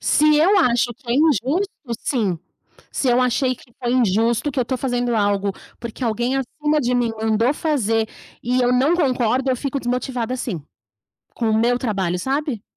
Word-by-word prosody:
Se 305 0 +4
eu 370 +7 +4
acho 245 -6 +2
que 240 0 -10
é - - +2
injusto? 310 - +2 0.3
Sim. 205 - -1 0.5
Se 265 - 0
eu 245 +1 +4
achei 255 +1 +1
que 240 0 -20
foi 240 0 0
injusto, 230 +2 +2
que 265 - -3
eu - - +3
estou 255 +2 -3
fazendo 245 -2 -1
algo, 205 -1 +1 0.3
porque 235 +2 -5
alguém 240 +3 0
acima 295 +3 -1
de 250 -2 0
mim 240 -2 +1
mandou 225 +3 +2
fazer 225 -9 0 0.3
e 250 +2 +1
eu 245 0 +3
não 265 +7 +3
concordo, 260 -4 +1
eu 255 - +1
fico 275 +2 -3
desmotivada 250 0 -2
sim. 205 - -4 0.7
Com 230 -2 0
o 220 - +2
meu 240 +2 +2
trabalho, 195 -7 -1
sabe? 270 - -2
245 Hz, 180 wpm, -21 LUFS, 230-270 Hz, 0.7 s, Se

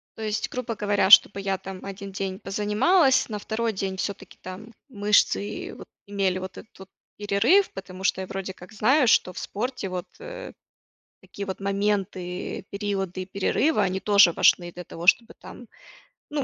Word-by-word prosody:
То 220 - -7
есть, 210 -1 -2
грубо 250 -2 -4
говоря, 205 -2 +1
чтобы 200 -1 +8
я, 195 -1 -1
там, 190 0 -9
1 195 0 -7
день 190 0 -4
позанималась, 220 - +2
на 210 - -3
2 225 +2 -2
день 190 0 -3
всё-таки, 200 +1 -5
там, 205 +5 -9 0.2
мышцы, 205 -1 +1
вот, - - -11 0.2
имели 195 -2 0
вот 185 0 -8
этот 215 - -14
вот 190 0 -12 0.3
перерыв, 210 - +3
потому 190 0 -9
что 190 - +1
я 185 - -6
вроде 195 -1 -5
как 185 +5 -14
знаю, 255 +5 +3
что 185 - +4
в - - -15
спорте, 230 -2 -4
вот, 180 -1 -5
э, - - -8 0.7
такие 200 0 -8
вот 190 - -5
моменты, 195 -2 -2
периоды 195 -2 -3
и 185 - -8
перерывы, 210 +8 +1
они 190 -1 +1
тоже 200 -4 +6
важны 175 +1 +3
для 180 0 -9
того, 170 +2 -8
чтобы, 230 +2 +4
там, 245 - -12 0.6
ну, 290 -2 -2
200 Hz, 170 wpm, -25 LUFS, 190-215 Hz, 0.7 s, чтобы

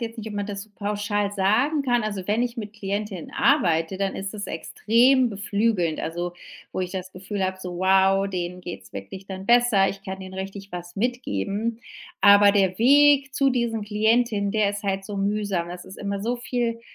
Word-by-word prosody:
jetzt 230 0 -16
nicht, 220 - -6
ob 215 - -6
man 205 0 -2
das 200 -1 -5
so 215 - -26
pauschal 205 0 -1
sagen 220 +10 +2
kann. 245 -3 +1
Also, 205 -4 -4
wenn 215 +3 +1
ich 245 0 -3
mit 210 -3 -6
Klientinnen 200 -3 -4
arbeite, 175 - +2
dann 195 0 -2
ist 195 +2 -5
es 205 -2 -5
extrem 240 +9 +3
beflügelnd, 200 -4 0
also, 175 +2 -3 0.4
wo - - -2
ich 180 - -3
das 185 -1 -6
Gefühl 190 +2 -4
habe: 185 0 -2
So 180 -1 -6
wow, 190 +1 +3
denen 180 -1 -4
geht 175 -1 -7
es - - -18
wirklich 100 - -8
dann 190 0 -7
besser. 235 -5 +4
Ich 195 0 -6
kann 190 0 -6
denen 190 0 -9
richtig 195 +1 -7
was 175 0 -7
mitgeben. 225 - -2 0.4
Aber 205 0 +7
der 195 -2 +2
Weg 280 +3 +5
zu 275 0 +2
diesen 235 -3 -1
Klientinnen, 215 0 +1
der 210 -1 +2
ist 205 +1 -6
halt 195 -1 -2
so 205 0 -6
mühsam. 200 -3 -1
Das 175 0 -8
ist 190 - -11
immer 200 -1 -3
so 235 +4 -1
viel 240 -1 -2
200 Hz, 200 wpm, -24 LUFS, 190-225 Hz, 0.4 s, Aber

